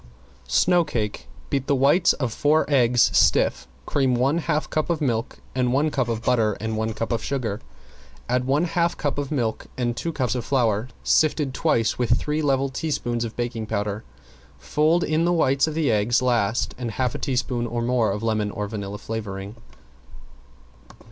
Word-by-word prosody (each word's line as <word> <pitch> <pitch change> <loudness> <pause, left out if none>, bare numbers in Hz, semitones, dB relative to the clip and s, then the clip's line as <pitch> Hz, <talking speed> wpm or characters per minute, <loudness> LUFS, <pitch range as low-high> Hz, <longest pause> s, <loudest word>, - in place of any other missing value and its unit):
~SNOW 175 - +3
CAKE~ 105 -7 -3 0.2
Beat 135 -1 -1
the 140 - +3
white 145 +7 +4
of 125 -5 -1
four 150 +5 +2
eggs 125 -4 +3
stiff. 65 0 +3 0.2
Cream 135 -3 +1
one 135 +7 +2
half 155 -2 -1
cup 155 +1 -2
of 170 -3 0
milk 120 -6 -1 0.2
and 125 -1 +1
one 145 +4 +2
cup 130 -4 0
of 115 -1 -3
butter 115 -5 +2
and 110 +2 -4
one 110 0 -1
cup 115 +2 -4
of 115 -2 -1
sugar, 120 -6 -3 0.7
add 125 +1 0
one 140 +5 +2
half 170 0 0
cup 145 -1 -2
of 140 0 -4
milk 120 -7 -2
and 120 -2 -1
two 165 +7 -3
cups 130 -6 -1
of 125 -2 -3
flour 115 -4 +1 0.2
sifted 150 -3 +2
twice 120 -8 +1
with 120 0 +2
three 150 +1 -1
level 135 -2 +1
teaspoons 125 -4 -2
of 115 -1 -5
baking 120 -2 -3
powder. 105 0 -2 0.5
Fold 155 - +1
in 155 +2 +1
the 175 +1 +2
whites 140 -3 +2
of 155 - -4
the 160 -3 +1
eggs 110 +3 +2
last 120 -3 0
and 120 -2 -3
half 125 +1 -1
a - - -5
teaspoon 125 -3 -1
or 120 0 -2
more 120 -3 +1
of 105 +2 -4
lemon 110 -2 0
or 105 0 -4
vanilla 100 -1 -5
flavoring. 105 -2 -6
125 Hz, 180 wpm, -23 LUFS, 110-145 Hz, 0.7 s, white